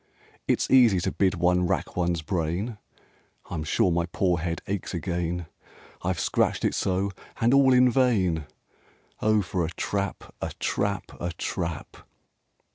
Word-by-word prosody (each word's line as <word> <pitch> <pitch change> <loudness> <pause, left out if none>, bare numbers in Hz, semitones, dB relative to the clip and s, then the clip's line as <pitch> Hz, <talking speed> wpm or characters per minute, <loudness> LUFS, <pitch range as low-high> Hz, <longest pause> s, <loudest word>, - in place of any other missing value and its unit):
It's - - +1
easy 120 -8 +6
to - - -1
bid 95 -1 +1
one 90 +1 +2
rack - - -2
one's 85 -2 0
brain, 90 +7 -2 0.7
I'm 80 -3 -2
sure 85 +3 +2
my 85 0 0
poor 90 -1 +1
head 85 0 -3
aches 100 -1 -3
again, 85 0 -2 0.6
I've 90 -1 -1
scratched - - +1
it - - +1
so, 95 +1 0 0.3
and 120 +3 +3
all 135 -1 +6
in 125 0 +6
vain. 95 - +2 0.7
Oh 110 -1 +3
for 90 0 -1
a 80 - -1
trap, 100 +2 -3
a - - -3
trap, 100 -1 -1
a 85 - -2
trap!" 85 -2 -4
90 Hz, 145 wpm, -26 LUFS, 85-100 Hz, 0.7 s, easy